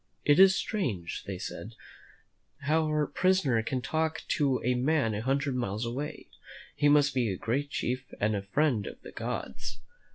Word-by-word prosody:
"It 145 +2 +5
is 190 0 +8
strange," 110 - -2
they 95 -2 -4
said, 110 +3 -7 0.9
"our 155 0 +2
prisoner 175 -10 +2
can 125 +2 -2
talk 160 0 -1
to 140 -4 +2
a 125 - +2
man 130 -2 +1
a 105 - -2
hundred 135 +2 0
miles 115 -2 -2
away. 130 +6 -5 0.5
He 145 - +3
must 145 -1 +5
be 125 -4 +1
a 95 - -3
great 140 +8 -1
chief 130 -1 -3
and 105 +1 +1
a 100 - -1
friend 110 +2 +1
of - - -8
the - - -9
gods." - - -5
135 Hz, 165 wpm, -29 LUFS, 115-150 Hz, 0.9 s, is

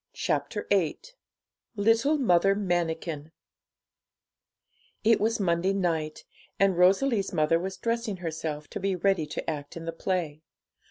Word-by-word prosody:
CHAPTER 210 - -2
VIII 185 -6 +2 0.8
LITTLE 225 +8 +3
MOTHER 195 -6 +3
MANIKIN 165 -5 -2 1.7
It 225 +1 +4
was 225 +1 +1
Monday 180 0 +1
night, 165 -5 -2 0.3
and 195 -2 +4
Rosalie's 195 +5 +3
mother 155 +2 +2
was 190 +2 -5
dressing 230 -3 -2
herself, 160 -3 -4
to - - -5
be 195 -1 0
ready 180 -3 +1
to - - -5
act 145 -1 -4
in 165 - -7
the 165 - -2
play. 165 -4 -2
180 Hz, 125 wpm, -27 LUFS, 165-200 Hz, 1.7 s, It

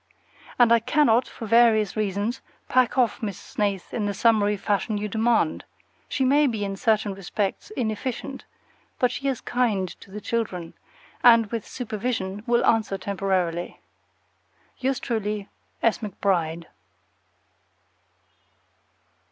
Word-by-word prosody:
And 240 -2 +5
I 235 - +6
cannot, 250 0 +3
for 225 - -8
various 220 -2 +4
reasons, 210 +3 -1 0.3
pack 255 -1 +2
off 245 -4 +2
Miss 205 -5 -3
Snaith 200 -3 -3
in 210 -3 -1
the 200 - -2
summary 210 -1 +3
fashion 205 +2 -1
you 210 +1 -2
demand. 220 -6 +1 0.5
She 265 - 0
may 290 +3 +4
be, 220 -5 -2
in 195 0 -3
certain 215 -1 +1
respects, 195 - -3
inefficient; 250 +3 -3 0.5
but 250 -4 +2
she 275 - -3
is 265 -3 -1
kind 220 -7 0
to - - -15
the 205 +2 -7
children, 205 -7 -3 0.5
and 230 -2 +7
with 230 -3 -4
supervision 215 -4 -3
will 235 0 +3
answer 220 -3 +2
temporarily. 185 -3 -2 1.0
Yours 265 0 0
truly, 210 -4 -3 0.3
S. 230 -3 +3
McBRIDE. 175 -6 -1
215 Hz, 125 wpm, -25 LUFS, 200-240 Hz, 1.0 s, and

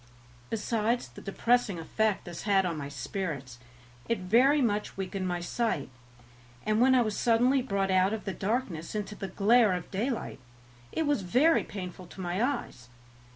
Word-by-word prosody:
Besides 225 +2 -1
the - - -12
depressing 230 0 +1
effect 210 +5 0
this 175 -1 -7
had 195 -2 +3
on 170 -2 -1
my 140 -2 -5
spirits, 140 -4 -5 0.5
it 230 - +2
very 245 +11 +4
much 210 -7 0
weakened 190 0 -3
my 175 -1 -2
sight, 175 - -1 0.8
and 215 +1 +2
when 260 +1 +6
I 250 - +5
was 215 -2 -2
suddenly 245 +3 +3
brought 195 -6 -1
out 185 +1 +4
of 220 -1 -4
the 195 - -2
darkness 195 -6 -2
into 210 0 -3
the 200 -1 -5
glare 215 +3 +4
of 180 -2 -5
daylight 225 - -2 0.5
it 320 - -1
was 290 -6 +1
very 255 - +3
painful 185 -2 -7
to 190 - -13
my 180 +2 -2
eyes. 240 - -3
205 Hz, 165 wpm, -29 LUFS, 180-235 Hz, 0.8 s, when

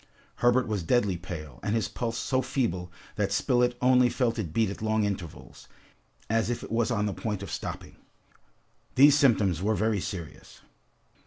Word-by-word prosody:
Herbert 120 +1 +3
was 105 -3 -1
deadly 105 +1 +1
pale, 80 -7 -8
and 105 - -1
his 115 - 0
pulse 115 -1 -4
so 130 +1 0
feeble 115 -9 -2 0.3
that 100 -2 0
Spilett 125 +3 +1
only 125 -1 +5
felt 120 -1 0
it 90 -8 -3
beat 110 +2 +1
at 100 - -8
long 110 0 +1
intervals, 95 -6 -6 0.6
as 115 +1 +1
if 120 - -3
it - - -9
was 115 -1 +1
on 105 -4 0
the 105 - -1
point 105 -2 -4
of 95 - -7
stopping. - - -6 1.0
These 145 +2 +7
symptoms 105 - +3
were 110 +3 +1
very 110 0 +1
serious. 90 -4 -8
110 Hz, 170 wpm, -27 LUFS, 95-120 Hz, 1.0 s, These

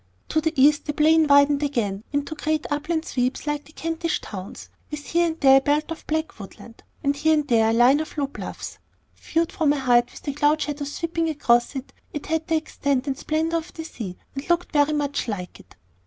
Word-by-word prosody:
To 315 - +1
the 320 0 0
east 295 +2 +5
the 295 - -2
plain 315 +1 +4
widened 285 0 +5
again 220 -9 -1
into 285 +1 -2
great 310 0 -1
upland 315 +3 -1
sweeps 250 +2 -1
like 295 -1 -2
the - - -17
Kentish 330 +1 -2
Downs, 190 -2 -9 0.2
with 300 -1 -7
here 345 +1 +2
and 325 0 -4
there 270 -1 +7
a - - +3
belt 295 +3 0
of 330 - -7
black 315 -5 -2
woodland, 225 +3 -12 0.2
and 280 0 +1
here 315 +2 +3
and 300 -1 -1
there 225 -3 +3
a - - +2
line 245 +5 +5
of 315 0 -6
low 285 - +1
bluffs. 275 - -8 0.4
Viewed 330 +2 -1
from 305 -5 +2
a 290 - -2
height, 245 -2 +3
with - - -13
the 285 - -3
cloud 295 +2 +2
shadows 290 -1 -3
sweeping 330 -1 -1
across 240 -4 +2
it, 265 -1 -6 0.2
it 295 - -5
had 320 0 -1
the 325 - +1
extent 280 -4 -1
and 275 -2 -1
splendor 320 +3 -1
of 325 0 -7
the 320 - -5
sea, 215 - -7 0.2
and 275 +3 -7
looked 345 0 +1
very 295 0 +3
much 285 -3 -1
like 185 -5 -5
it. - - -18
295 Hz, 220 wpm, -24 LUFS, 270-315 Hz, 0.4 s, there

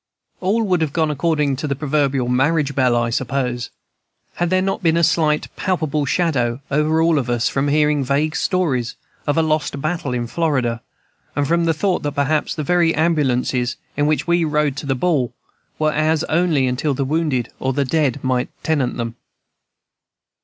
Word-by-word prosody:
All 210 +5 +1
would 185 -5 +1
have 150 -3 -1
gone 160 -2 +1
according 150 -2 0
to 150 - -3
the 140 - -1
proverbial 140 -3 0
marriage 145 +4 +1
bell, 130 -3 +2
I 120 0 0
suppose, 125 -1 -2 0.7
had 175 0 0
there 185 +1 +3
not 195 0 -1
been 165 -2 +2
a 170 - +2
slight 155 -2 +2
palpable 155 -6 -1
shadow 130 -8 0
over 155 +3 +2
all 165 -2 +3
of 125 -2 -4
us 120 -1 +1
from 135 +1 0
hearing 150 -1 +2
vague 145 +4 0
stories 145 -11 0 0.3
of 145 - +1
a 165 - +4
lost 155 -2 -1
battle 155 -2 -2
in 120 -1 -2
Florida, 125 -5 -1 0.5
and 145 -1 0
from 170 +2 +2
the 165 - +2
thought 185 +3 0
that 145 -1 -3
perhaps 145 +2 0
the 155 - -3
very 170 +1 +2
ambulances 130 -6 +1 0.2
in 145 +1 +1
which 155 0 +1
we 170 0 +2
rode 150 -3 +1
to 145 - -5
the 135 - +1
ball 135 -4 0 0.4
were 155 0 +1
ours 155 +1 +1
only 160 -4 +2
until 130 +3 0
the 135 - -1
wounded 145 -5 0
or 130 - 0
the 140 +1 0
dead 145 -1 0
might 130 -1 0
tenant 145 -6 0
them. 115 0 -4
150 Hz, 180 wpm, -20 LUFS, 130-160 Hz, 0.7 s, a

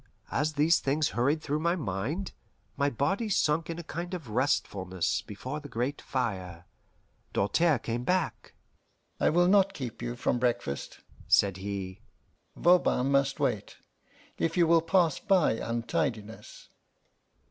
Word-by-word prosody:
As 155 +2 0
these 155 +3 +4
things 150 +3 +1
hurried 140 +6 0
through 150 +1 -1
my 170 +2 +1
mind, 145 - -3 0.4
my 140 0 +1
body 175 - -1
sunk 160 -4 +1
in 165 - -4
a 170 - -6
kind 175 +3 -5
of 160 -10 -8
restfulness 95 -8 0
before 130 +8 -6
the 145 -1 -11
great 125 +4 -2
fire, 95 -9 -3 0.7
Doltaire 155 - +2
came 120 +1 -3
back. 180 +2 -1 0.6
"I - - +3
will 175 +2 +4
not 195 0 +4
keep 125 - -6
you 120 0 -3
from 120 0 0
breakfast," 120 - -2 0.3
said 100 -2 +4
he. 95 -1 -5 0.5
"Voban 170 -7 +3
must 140 0 +2
wait, - - -1 0.6
if 165 +2 0
you 175 - +5
will 165 0 +5
pass 165 -2 +2
by 195 -5 +3
untidiness." 115 0 -3
140 Hz, 135 wpm, -29 LUFS, 115-165 Hz, 0.7 s, you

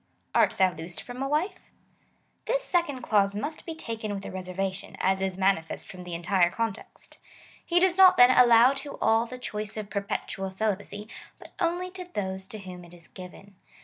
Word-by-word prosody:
Art - - +3
thou 185 -2 +4
loosed 165 0 -7
from 245 +1 -8
a 270 - 0
wife? 365 +6 -2 0.8
This - - 0
second 320 - -1
clause 200 -3 +2
must 290 +12 -5
be 330 - -4
taken 225 -8 -5
with 195 - -7
a - - -6
reservation, 185 +1 -4
as 190 0 +1
is 190 -1 -2
manifest 190 -4 0
from 185 - -10
the 175 -1 -5
entire 175 +1 +2
context. 230 +4 -6 0.4
He 350 0 +2
does 365 0 +3
not, 375 -1 +8
then, 245 +1 +8
allow 245 0 +7
to 280 +1 -7
all 225 +1 +2
the 255 - -8
choice 215 -4 -5
of 210 -1 -6
per 200 - -1
petual 195 -1 -4
celibacy, 205 +1 -3 0.3
but - - -15
only 355 +1 -1
to 370 -1 -8
those 190 -1 -3
to 215 - -7
whom 185 -3 -9
it 175 0 -14
is 170 -1 -17
given. 190 +2 -12
210 Hz, 190 wpm, -27 LUFS, 190-270 Hz, 0.8 s, not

